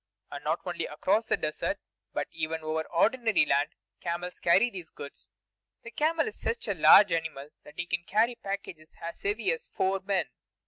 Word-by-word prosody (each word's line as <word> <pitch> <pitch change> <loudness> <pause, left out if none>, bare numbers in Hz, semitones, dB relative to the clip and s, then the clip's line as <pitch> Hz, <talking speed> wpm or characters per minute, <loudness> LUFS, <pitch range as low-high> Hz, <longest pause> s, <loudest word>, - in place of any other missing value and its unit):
And - - -7
not - - 0
only - - -3
across 220 +1 +1
the - - +2
desert, 155 0 -2 0.3
but - - -2
even 160 0 -3
over 155 0 -1
ordinary 225 +2 +3
land 145 +1 +1 0.2
camels 175 +1 -4
carry 195 +8 +4
these 180 -5 -8
goods. 140 -8 -11 0.5
The 235 - -8
camel 320 - +1
is 445 - -7
such 460 0 -2
a - - +1
large 205 -2 +8
animal 160 -4 -2
that 150 - -15
he 170 - -2
can 170 - -1
carry 225 +4 +3
packages 195 -8 -7
as 170 0 -7
heavy 205 +3 0
as 485 0 -4
four 190 +1 0
men. 190 -7 -1
185 Hz, 180 wpm, -29 LUFS, 160-225 Hz, 0.5 s, large